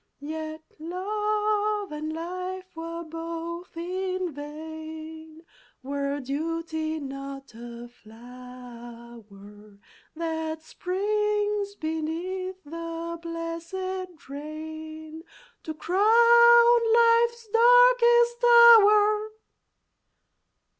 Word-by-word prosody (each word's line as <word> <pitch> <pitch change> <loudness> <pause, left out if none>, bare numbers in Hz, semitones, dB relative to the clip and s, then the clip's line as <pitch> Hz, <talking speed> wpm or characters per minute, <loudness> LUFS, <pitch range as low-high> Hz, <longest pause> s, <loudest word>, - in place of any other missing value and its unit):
Yet 315 +1 -6 0.2
love 420 +3 -1
and 305 +1 -5
life 365 +3 -6
were 335 +1 -6
both 330 +1 -7
in 370 0 -3
vain 315 +2 -9 0.4
Were 280 +1 -3
duty 315 +3 -3
not 275 -1 -8
a 235 +1 -10
flower 235 -3 -14 0.4
That 320 -1 -4
springs 415 +3 -2
beneath 355 +4 -4
the 335 +2 -6
blesséd 335 +2 -6
rain 315 +2 -8 0.4
To 315 - -6
crown 470 +5 +5
Life's 470 0 +3
darkest 475 +1 +5
hour!" 430 -3 +6
330 Hz, 70 wpm, -26 LUFS, 310-415 Hz, 0.4 s, hour